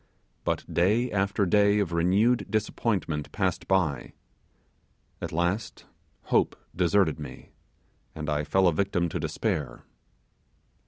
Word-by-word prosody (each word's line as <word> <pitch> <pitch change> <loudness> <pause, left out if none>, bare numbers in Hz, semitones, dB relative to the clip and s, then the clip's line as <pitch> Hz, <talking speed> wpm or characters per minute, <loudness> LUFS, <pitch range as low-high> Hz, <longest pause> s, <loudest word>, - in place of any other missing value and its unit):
But - - -1
day 110 +8 +2
after 100 0 +1
day 100 +2 +4
of 100 -5 0
renewed 95 +9 +2
disappointment 105 -8 -1
passed 95 -4 -1
by; 85 -9 0 1.1
at - - -4
last 85 +6 -2 0.4
hope - - +1 0.2
deserted 90 -2 +2
me, 75 - -9 0.6
and 75 -1 -5
I 75 -1 0
fell 95 +4 +3
a 85 - +3
victim 90 0 0
to - - -3
despair. 75 -4 -3
95 Hz, 115 wpm, -27 LUFS, 80-100 Hz, 1.1 s, day